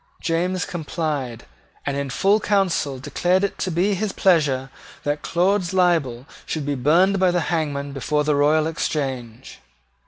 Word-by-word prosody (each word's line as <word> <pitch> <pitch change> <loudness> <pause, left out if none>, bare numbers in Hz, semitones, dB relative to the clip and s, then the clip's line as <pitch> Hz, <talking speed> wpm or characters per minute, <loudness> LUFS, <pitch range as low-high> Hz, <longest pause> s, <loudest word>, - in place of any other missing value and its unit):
James 180 +2 -1
complied, 150 -7 -4 0.4
and 140 - -1
in 140 -1 -2
full 195 +10 +3
council 190 -10 0
declared 180 +8 0
it 200 - -2
to 185 - -1
be 185 +4 +1
his 200 +1 -1
pleasure 145 -9 +2 0.3
that 145 0 -1
Claude's 185 +1 +1
libel 160 -10 +2 0.2
should 155 -3 -4
be 145 - -1
burned 170 +9 +3
by 185 -1 +4
the 175 0 +1
hangman 145 -3 -2
before 150 +2 0
the 150 0 +1
Royal 150 +2 +3
Exchange. 135 -7 -4
155 Hz, 150 wpm, -22 LUFS, 140-185 Hz, 0.4 s, by